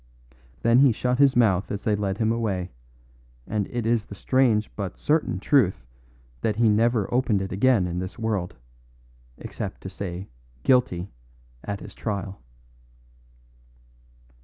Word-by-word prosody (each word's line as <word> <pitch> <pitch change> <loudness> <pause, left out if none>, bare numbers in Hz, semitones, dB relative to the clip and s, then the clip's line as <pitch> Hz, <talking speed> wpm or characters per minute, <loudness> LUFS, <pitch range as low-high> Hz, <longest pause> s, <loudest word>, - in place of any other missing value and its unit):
Then 115 +2 +5
he 135 -2 +6
shut 125 +3 -1
his 140 -2 +5
mouth 100 -6 +2
as 100 - -4
they 105 - +2
led 100 -1 -2
him 110 0 +1
away, 100 -6 -2 0.7
and 105 -2 -2
it 120 -2 -3
is 115 -1 +1
the 100 - -9
strange 115 -2 +1
but 100 -3 -5
certain 150 - 0
truth 100 - +2 0.6
that 110 - 0
he 115 0 +3
never 110 0 +2
opened 120 -5 +2
it 95 0 -4
again 110 0 +3
in 90 0 -3
this 95 +1 -6
world, 105 -6 -2 0.8
except - - -6
to - - -6
say 95 0 -6 0.4
"Guilty" 100 -8 +2 0.5
at 100 -1 -5
his - - -10
trial. 100 -3 -4
105 Hz, 140 wpm, -25 LUFS, 95-120 Hz, 0.8 s, he